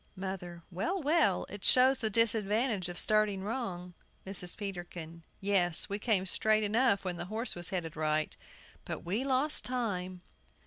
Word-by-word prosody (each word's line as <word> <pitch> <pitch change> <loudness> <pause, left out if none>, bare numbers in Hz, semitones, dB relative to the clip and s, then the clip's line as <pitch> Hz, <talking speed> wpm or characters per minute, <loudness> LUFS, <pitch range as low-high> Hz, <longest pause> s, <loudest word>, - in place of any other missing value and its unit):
MOTHER. 185 -3 -6
Well, 280 - -2
well; 300 - +2
it 205 0 -9
shows 260 +1 +5
the 220 - 0
disadvantage 215 -2 +1
of 175 - -6
starting 215 -3 +2
wrong. 190 -6 -4 0.3
MRS. 185 -2 -4
PETERKIN. 175 -4 -7 0.2
Yes, 190 -4 +1
we 200 +1 -2
came 210 -4 +1
straight 215 +3 +2
enough 215 -1 +2
when 180 -2 -2
the 175 - -4
horse 220 +6 -2
was 175 0 -2
headed 170 -4 -4
right; 155 0 -1 0.5
but - - -5
we 205 +9 -1
lost 275 +3 +5
time. 185 -8 -3
200 Hz, 150 wpm, -31 LUFS, 180-230 Hz, 0.5 s, shows